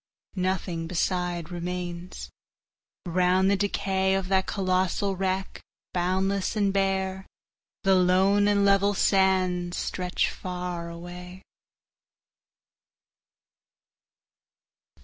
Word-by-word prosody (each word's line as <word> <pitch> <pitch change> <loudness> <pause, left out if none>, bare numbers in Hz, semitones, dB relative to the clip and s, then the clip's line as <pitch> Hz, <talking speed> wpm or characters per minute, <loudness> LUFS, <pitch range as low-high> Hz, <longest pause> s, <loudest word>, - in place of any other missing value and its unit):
'Nothing 185 -3 -2
beside 180 -1 -1
remains. 175 0 -5 0.7
Round 185 +2 +2
the - - +4
decayOf 190 -1 0
that 190 -1 +2
colossal 190 0 0
wreck, 190 0 -2 0.3
boundless 190 +3 0
and 200 -2 +1
bare, 190 -1 -1 0.6
The 195 -1 +4
lone 190 +2 +4
and 200 -1 +3
level 200 +1 +3
sands 185 -3 +2
stretch 180 -1 -1
far 180 -2 -5
away. 180 +2 -9
185 Hz, 80 wpm, -26 LUFS, 180-195 Hz, 0.7 s, the